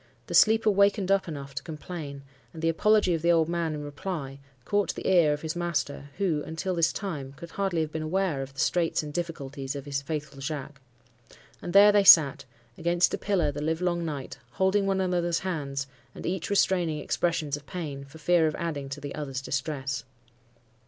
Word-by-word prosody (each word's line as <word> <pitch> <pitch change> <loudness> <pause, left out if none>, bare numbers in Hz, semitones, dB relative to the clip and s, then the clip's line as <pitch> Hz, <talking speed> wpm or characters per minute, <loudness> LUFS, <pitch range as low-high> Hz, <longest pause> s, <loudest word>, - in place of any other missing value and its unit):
The - - -7
sleeper 220 0 +5
wakened 200 -1 +3
up 195 -2 +2
enough 140 -4 -7
to - - -4
complain; 155 -3 -7 0.3
and 160 -1 -9
the 165 - +3
apology 210 +2 +3
of 165 - -1
the 170 +1 +3
old 165 -2 +3
man 170 -2 -1
in 150 - -5
reply 145 -2 -5 0.3
caught 205 -1 0
the - - -5
ear 175 -5 +5
of 150 +1 -3
his 160 +1 -3
master, 170 -5 -2
who, 175 -7 0
until 160 +4 -3
this 170 -1 +2
time, 150 -10 -5
could 165 +4 -11
hardly 190 -4 -1
have 155 -1 -3
been 160 - -3
aware 160 -2 0
of 135 0 -6
the 135 - -12
straits 170 0 +1
and 150 -1 -7
difficulties 140 -5 -4
of 140 - -6
his 140 -1 -2
faithful 145 -1 -5
Jacques. 140 -1 -5 0.8
And 175 - -5
there 200 +2 +8
they 205 -1 +4
sat,—against 145 +1 +4
a - - 0
pillar, 180 -8 +1
the 145 +1 -6
live 160 +2 -1
long 175 -1 0
night, 145 -5 -5
holding 195 +1 +2
one 195 -1 +1
another's 175 -2 0
hands, 140 -7 -3 0.3
and - - -8
each 185 -1 -2
restraining 180 -5 +2
expressions 150 -1 -1
of 145 -1 -11
pain, 150 -6 -5
for 140 +3 -13
fear 165 0 +3
of 155 - -2
adding 145 -5 -4
to 140 +1 -6
the 145 -1 -6
other's 135 -3 -4
distress. 135 -1 -3
160 Hz, 195 wpm, -27 LUFS, 140-180 Hz, 0.8 s, there